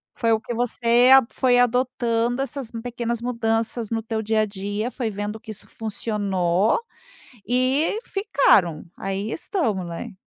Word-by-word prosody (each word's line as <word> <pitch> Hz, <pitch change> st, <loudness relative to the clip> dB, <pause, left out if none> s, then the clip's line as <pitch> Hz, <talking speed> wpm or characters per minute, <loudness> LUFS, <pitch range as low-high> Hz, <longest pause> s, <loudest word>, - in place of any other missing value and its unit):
Foi 230 Hz, -1 st, +1 dB
o 220 Hz, -, +3 dB
que 240 Hz, -, -6 dB
você 240 Hz, +1 st, +3 dB
a 265 Hz, -2 st, +7 dB
foi 250 Hz, -2 st, +2 dB
adotando 245 Hz, 0 st, +1 dB
essas 270 Hz, -3 st, -4 dB
pequenas 235 Hz, -1 st, -3 dB
mudanças 230 Hz, -1 st, -1 dB
no 225 Hz, -1 st, -1 dB
teu 225 Hz, 0 st, -3 dB
dia 220 Hz, 0 st, +1 dB
a -, -, +2 dB
dia, 205 Hz, +3 st, -4 dB
foi 245 Hz, -4 st, -3 dB
vendo 205 Hz, +1 st, -5 dB
que 220 Hz, -1 st, -9 dB
isso 210 Hz, -, -10 dB
funcionou 205 Hz, -3 st, 0 dB, 0.7 s
e 260 Hz, -, +1 dB
ficaram. 275 Hz, -, +2 dB
Aí 195 Hz, +3 st, -3 dB
estão, 330 Hz, -, -1 dB
né? 175 Hz, +7 st, -6 dB
230 Hz, 145 wpm, -23 LUFS, 210-245 Hz, 0.7 s, a